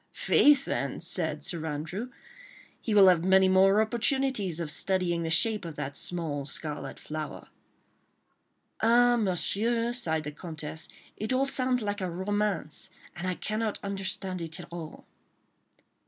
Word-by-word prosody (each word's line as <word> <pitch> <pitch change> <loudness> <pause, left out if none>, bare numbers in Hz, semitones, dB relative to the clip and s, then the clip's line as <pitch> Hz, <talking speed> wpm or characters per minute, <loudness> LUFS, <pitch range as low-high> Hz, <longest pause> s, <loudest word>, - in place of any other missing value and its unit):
"Faith, 285 -2 +4
then," 140 - -2
said 160 -3 0
Sir 170 0 -3
Andrew, 160 +10 -4 0.7
"he 220 - -1
will 195 -2 +8
have 175 -3 +5
many 190 +1 +5
more 190 +2 +5
opportunities 235 - 0
of 160 -3 -2
studying 180 -1 0
the 165 - -2
shape 210 +6 +2
of 165 -3 -7
that 140 0 -5
small 160 -5 -3
scarlet 150 +2 -4
flower." 155 0 -6 1.3
"Ah! 240 +2 +5
Monsieur," 230 +3 0
sighed 160 -10 -1
the 150 - -5
Comtesse, 155 0 -6 0.3
"it 215 +3 -1
all 260 +1 +2
sounds 255 -3 0
like 205 0 -2
a 185 - -1
romance, 190 -2 -2 0.3
and 175 +1 -4
I 180 - -1
cannot 215 +2 -2
understand 195 -2 -3
it 160 -1 -5
all." 170 -2 -8
190 Hz, 140 wpm, -28 LUFS, 160-220 Hz, 1.3 s, will